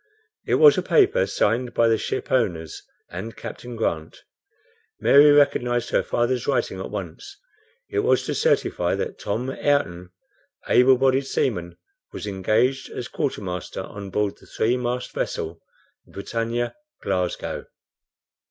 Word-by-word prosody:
It - - +3
was 450 -2 +7
a - - 0
paper 430 +3 +3
signed 120 +3 0
by 115 - +4
the 115 - +4
shipowners 85 - -1 0.3
and 95 +6 -6
Captain 120 -1 -8
Grant. 80 -8 -3 0.8
Mary 145 +2 +7
recognized 125 -5 +3
her - - +3
father's 120 +1 -1
writing 120 -8 0
at 95 - -5
once. 100 - -7 0.5
It - - -2
was 420 +3 +2
to - - -2
certify 485 +1 +1
that 465 -2 -4
"Tom 120 +6 -2
Ayrton, 115 -13 0 0.6
able 130 +1 +5
bodied 135 +1 +2
seaman, 85 -12 -1 0.3
was - - -6
engaged 110 +7 0
as 120 - -6
quartermaster 100 - -4
on 100 -1 -8
board 105 +1 -1
the - - -18
three 115 +3 0
mast 125 0 -3
vessel, 80 +1 -3 0.5
the - - -21
BRITANNIA, 115 +4 -2 0.3
Glasgow." 90 -1 -2
120 Hz, 135 wpm, -23 LUFS, 100-130 Hz, 0.8 s, was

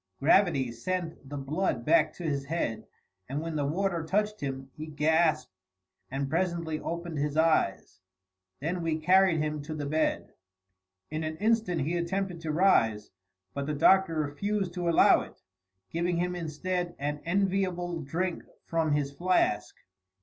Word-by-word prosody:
Gravity 145 -5 +3
sent 165 +3 -4
the 145 - -5
blood 135 -3 -1
back 160 -1 +4
to 175 - -9
his 140 -4 -1
head, 140 -7 -2 0.4
and 140 +2 -2
when 165 0 -4
the 145 -2 0
water 175 +1 -1
touched 210 +5 -1
him, 135 -1 -5
he 155 +1 -7
gasped 155 +1 +2 0.6
and 135 +1 -2
presently 165 0 -1
opened 170 -2 -4
his 150 +1 -1
eyes. 160 - +1 0.6
Then 175 +4 -2
we 165 -1 0
carried 185 +1 +4
him 150 -1 -2
to 155 +2 -6
the 150 -1 -4
bed. 155 +2 -1 0.8
In 155 +1 -2
an 155 0 -4
instant 215 -6 +1
he 165 +6 -1
attempted 180 0 -2
to 160 -2 -2
rise, 115 - +3 0.4
but 140 0 -3
the 150 - -1
Doctor 190 +3 +4
refused 175 +6 -1
to 175 -1 -1
allow 165 - +6
it, - - -12 0.5
giving 170 +1 0
him 180 +1 -1
instead 175 +2 -3
an 145 +1 -3
enviable 180 -2 0
drink 170 +5 -2 0.2
from 160 -2 0
his 145 -1 0
flask. 140 - +1
160 Hz, 150 wpm, -29 LUFS, 145-180 Hz, 0.8 s, allow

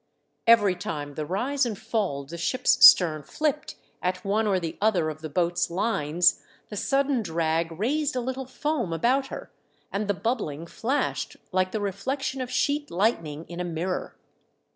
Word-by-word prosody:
Every 210 -5 +6
time 150 -7 -5
the 150 +1 -4
rise 265 - 0
and 230 -5 -1
fall 215 -11 -2
of 135 - -18
the 170 - -6
ship's 255 +8 +2
stern 160 -4 +8
flipped 300 - -2 0.3
at 180 +1 -2
one 215 +2 +1
or 195 -2 +2
the 165 -2 -4
other 180 -7 +2
of 155 0 -11
the 155 - -5
boat's 175 +3 0
lines 175 -3 +2 0.3
the 210 - -7
sudden 275 +3 +1
drag 165 -2 -1
raised 270 - -1
a - - +1
little 260 +1 -4
foam 260 - -2
about 255 - +1
her, - - -8 0.4
and 205 +1 -2
the 205 - +1
bubbling 180 - -2
flashed 255 +11 -2
like 185 0 +1
the - - -2
reflec 205 +7 -3
tion 270 -1 -2
of 250 - -4
sheet 285 +3 0
lightning 170 -6 -1
in 175 0 -8
a - - -1
mirror. 175 +2 -3
200 Hz, 175 wpm, -26 LUFS, 170-255 Hz, 0.4 s, stern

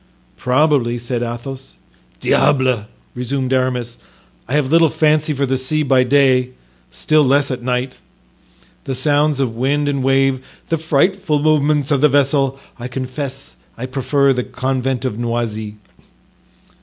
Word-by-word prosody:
"Probably," 125 - +1
said 120 0 -3
Athos. 120 +3 -6 0.4
"Diable!" 130 - +2 0.3
resumed 130 +1 -2
Aramis, 125 -2 -1 0.5
"I 125 - -5
have 145 -2 +1
little 165 -1 +5
fancy 155 +1 +1
for 140 -1 0
the 130 0 0
sea 155 +4 0
by 130 -2 +3
day, 130 -1 +2 0.4
still 150 - +2
less 140 +1 +2
at 125 -1 -4
night; 125 +1 -2 0.9
the 135 - -3
sounds 145 0 +2
of 125 -5 -1
wind 140 +4 0
and 140 -2 -1
wave, 135 -1 +2 0.3
the 165 - 0
frightful 160 +1 +1
movements 150 -2 +2
of 140 -2 +2
the 150 - +5
vessel; 140 -1 +1 0.2
I 120 - -5
confess 130 +2 -6 0.2
I 120 - -5
prefer 135 +1 +1
the 125 -1 -2
convent 130 0 -2
of 115 -3 -3
Noisy." 115 -3 -3
135 Hz, 140 wpm, -18 LUFS, 125-145 Hz, 0.9 s, little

